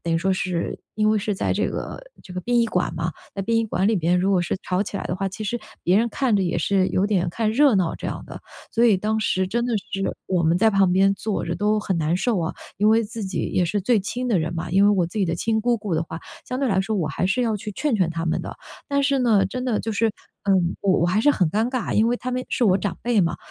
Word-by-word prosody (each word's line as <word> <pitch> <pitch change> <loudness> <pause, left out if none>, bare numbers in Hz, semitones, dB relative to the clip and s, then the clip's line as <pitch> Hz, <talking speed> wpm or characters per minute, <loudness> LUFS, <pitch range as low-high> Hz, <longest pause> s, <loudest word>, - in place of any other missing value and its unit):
等 170 - -1
于 165 - +2
说 190 +3 +1
是 180 -2 -2 0.2
因 215 0 +3
为 215 - +2
是 210 +1 -2
在 - - -1
这 - - 0
个 - - -6 0.2
这 185 - -11
个 180 - -3
殡 240 +6 +1
仪 230 - +2
馆 180 -5 -1
嘛 165 +1 -2 0.2
在 195 - -3
殡 230 +4 0
仪 225 - +1
馆 195 -2 0
里 220 - +3
边， 175 +1 +2
如 190 +2 +1
果 180 -2 +3
是 175 - -2
吵 185 +1 0
起 200 - -6
来 - - -4
的 180 - -2
话， 195 +1 -2
其 215 +3 -7
实 240 +4 -2 0.3
别 180 +2 +4
人 230 +3 +3
看 245 0 0
着 200 - +2
也 170 -2 0
是 185 +3 +2
有 190 - +1
点 185 -4 +1
看 215 +5 0
热 275 +1 +5
闹 180 -4 +1
这 - - -10
样 - - -5
的。 - - -9 0.3
所 230 - +3
以 220 -5 +5
当 215 +3 -1
时 190 -3 +1
真 235 +5 -1
的 240 - 0 0.2
是， 195 0 -2
我 180 -2 +1
们 165 +2 +2
在 220 +3 +4
旁 195 -3 +3
边 195 +2 +4
坐 210 +1 -3
着 - - -2
都 210 +1 +1
很 195 -3 -1
难 160 +2 +1
受 205 0 0
啊。 160 - -2 0.2
因 210 +2 +4
为 225 +1 +4
自 225 +1 -6
己 190 - -2
也 180 - +2
是 200 +5 -1
最 220 +2 +2
亲 245 +6 -4
的 215 -6 +2
人 160 +1 -2
嘛 165 +1 -4
因 190 +3 +4
为 205 - +6
我 185 -4 +2
自 175 +6 -6
己 - - +3
的 165 -2 -1
亲 220 +5 0
姑 240 +1 +2
姑 205 -5 -3
的 160 - +1
话， 160 0 -7 0.3
相 255 - -3
对 275 - +1
来 190 -3 +2
说 215 +3 -2
我 175 -6 0
还 155 - -2
是 220 +7 +1
要 225 -3 0
去 210 +1 -6
劝 290 +5 -1
劝 185 -5 +1
她 165 0 -3
们 160 - 0
的。 - - -7 0.3
但 280 -1 +1
是 275 0 +2
呢 220 -6 +4
真 250 +6 -4
的 235 -4 +1
就 225 - -3
是， 225 +2 +2 0.4
嗯， 185 -3 +2
我 190 -2 +2
我 - - +3
还 185 +5 +2
是 290 - +5
很 180 - +2
尴 220 +6 +1
尬， 255 -2 -2
因 220 +2 +3
为 245 - +1
她 255 - -5
们 255 0 -1
是 245 - 0
我 190 -3 +4
长 190 -3 -3
辈 235 -3 +2
嘛， 170 -2 0
200 Hz, 320 characters per minute, -23 LUFS, 180-225 Hz, 0.4 s, 为